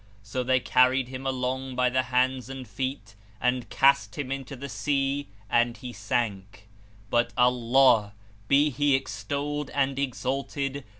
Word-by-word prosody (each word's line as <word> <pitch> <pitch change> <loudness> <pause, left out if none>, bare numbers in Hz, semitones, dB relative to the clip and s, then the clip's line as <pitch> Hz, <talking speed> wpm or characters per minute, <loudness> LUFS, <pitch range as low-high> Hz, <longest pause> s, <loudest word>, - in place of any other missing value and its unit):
So 120 +5 -3
they 130 +1 +3
carried 125 +1 +3
him 130 +1 -5
along 130 0 -2
by 125 0 +2
the 130 +1 +2
hands 130 0 0
and 135 -2 -7
feet 130 -6 -4 0.3
and 125 -2 0
cast 140 +3 +3
him 140 -3 -4
into 135 0 -5
the 140 +2 -7
sea 140 0 -1 0.2
and 120 +1 +2
he 125 -3 -8
sank; 105 -2 -3 0.4
but 120 0 +2
Allah 125 -3 +4 0.3
(be 145 +4 +4
He 145 +1 +2
extolled 140 +5 -3
and 135 -1 +1
exalted!) 140 +1 -3
130 Hz, 140 wpm, -27 LUFS, 120-135 Hz, 0.4 s, Allah